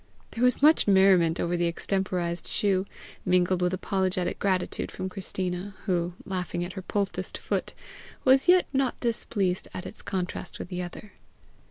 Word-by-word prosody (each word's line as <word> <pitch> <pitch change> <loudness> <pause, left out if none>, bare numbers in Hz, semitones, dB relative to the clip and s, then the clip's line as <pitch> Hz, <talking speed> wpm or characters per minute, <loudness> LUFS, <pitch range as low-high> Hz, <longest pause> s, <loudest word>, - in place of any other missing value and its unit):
There 235 - -2
was 250 +2 +3
much 310 -4 +6
merriment 190 -4 +5
over 175 +1 0
the 175 0 +1
extemporized 175 -1 -2
shoe, 195 -1 +1 0.4
mingled 180 0 +2
with 180 0 +2
apologetic 185 -1 -1
gratitude 185 -2 0
from 190 - -5
Christina, 185 0 -4
who, 175 -3 0
laughing 180 -2 -2
at 180 - -7
her 190 - -5
poulticed 200 +1 -2
foot, - - -3 0.5
was 265 +3 +5
yet 360 0 +6
not 265 -2 +1
displeased 200 -6 -1
at 180 - -5
its - - -9
contrast 185 -2 -4
with - - -7
the 180 -1 -3
other. 180 +4 -8
185 Hz, 155 wpm, -27 LUFS, 180-200 Hz, 0.5 s, much